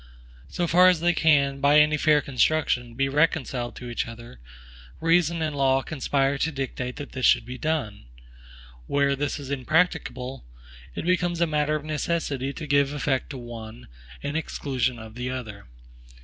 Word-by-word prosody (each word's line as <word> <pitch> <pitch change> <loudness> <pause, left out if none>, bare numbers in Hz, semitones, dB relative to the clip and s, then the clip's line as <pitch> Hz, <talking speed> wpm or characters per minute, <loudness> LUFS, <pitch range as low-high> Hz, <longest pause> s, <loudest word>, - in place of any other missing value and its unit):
So 175 - -1
far 180 +2 +6
as 180 -3 +4
they 175 +1 +2
can, 140 -4 +3
by 145 +1 +6
any 150 0 +4
fair 150 0 +3
construction, 125 -3 0
be 135 +2 +1
reconciled 135 -4 0
to 125 - -8
each 120 0 -3
other, 115 - -11 0.6
reason 165 0 +2
and 155 -2 -2
law 135 -1 +2
conspire 140 -1 0
to 160 - 0
dictate 130 -2 -4
that 145 - -8
this 130 - -6
should 115 - +4
be 125 +1 -8
done; 140 - -2 0.8
where 140 0 +2
this 145 +2 -2
is 140 -1 -7
impracticable, 140 -2 0 0.5
it - - -4
becomes 175 -1 +1
a 170 - +4
matter 150 -1 0
of 150 -1 -4
necessity 150 -3 -2
to 155 - -7
give 140 0 +2
effect 135 -2 -1
to 140 - -6
one, 115 - -9 0.3
in 145 +1 -3
exclusion 130 -6 -2
of 110 -1 -10
the 125 +2 -4
other. 110 - -7
140 Hz, 165 wpm, -25 LUFS, 125-155 Hz, 0.8 s, far